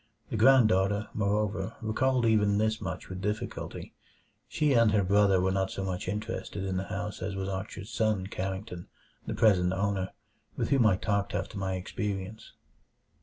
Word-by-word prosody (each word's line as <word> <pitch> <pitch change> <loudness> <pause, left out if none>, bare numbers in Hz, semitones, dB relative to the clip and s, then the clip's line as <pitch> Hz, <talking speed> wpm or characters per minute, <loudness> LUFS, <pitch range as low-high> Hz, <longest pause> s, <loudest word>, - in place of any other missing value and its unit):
The - - -1
granddaughter, 105 -5 +4
moreover, 105 +1 -1
recalled 125 +3 +1
even 105 -2 +3
this 110 +1 0
much 95 - -5
with 95 0 -6
difficulty. 105 +4 -4 0.5
She 150 -2 +1
and 115 -3 +5
her 105 -2 +3
brother 100 0 +4
were 95 +1 +1
not 95 0 0
so 95 - -4
much 90 -1 -3
interested 105 -1 -4
in 95 -1 -2
the 95 - -2
house 100 +2 -5
as 100 - -3
was 95 0 -3
Archer's 100 +2 -5
son 110 -5 +1
Carrington, 95 -1 -5 0.4
the - - -2
present 95 -5 +4
owner, 95 -1 -1 0.5
with - - -1
whom 130 -5 +4
I 100 - +4
talked 100 +1 -1
after - - -3
my 95 -1 -2
experience. 100 +2 -5
100 Hz, 165 wpm, -29 LUFS, 95-110 Hz, 0.5 s, and